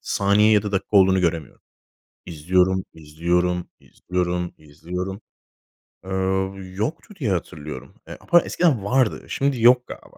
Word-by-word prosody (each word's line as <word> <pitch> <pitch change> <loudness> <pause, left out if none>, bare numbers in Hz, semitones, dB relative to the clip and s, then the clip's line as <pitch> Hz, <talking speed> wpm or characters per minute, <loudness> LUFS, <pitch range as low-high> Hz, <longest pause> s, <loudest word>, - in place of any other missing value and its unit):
saniye 100 +2 +2
ya 105 -1 +4
da 105 - -5
dakika 100 +1 0
olduğunu 95 -1 +5
göremiyorum. 85 -5 -2 0.6
İzliyorum, 90 +4 +1
izliyorum, 85 +3 -1
izliyorum 90 -1 -3
izliyorum. 90 +6 -6 0.9
Eee, - - -9 0.7
yoktu 155 - -4
diye 115 -9 -1
hatırlıyorum. 75 -4 -6
E, - - -9
ama 175 - +7
eskiden 150 - +1
vardı. 125 +1 +1
Şimdi 135 -4 -1
yok 125 +1 +5
galiba. - - -12
95 Hz, 125 wpm, -22 LUFS, 85-110 Hz, 0.9 s, ama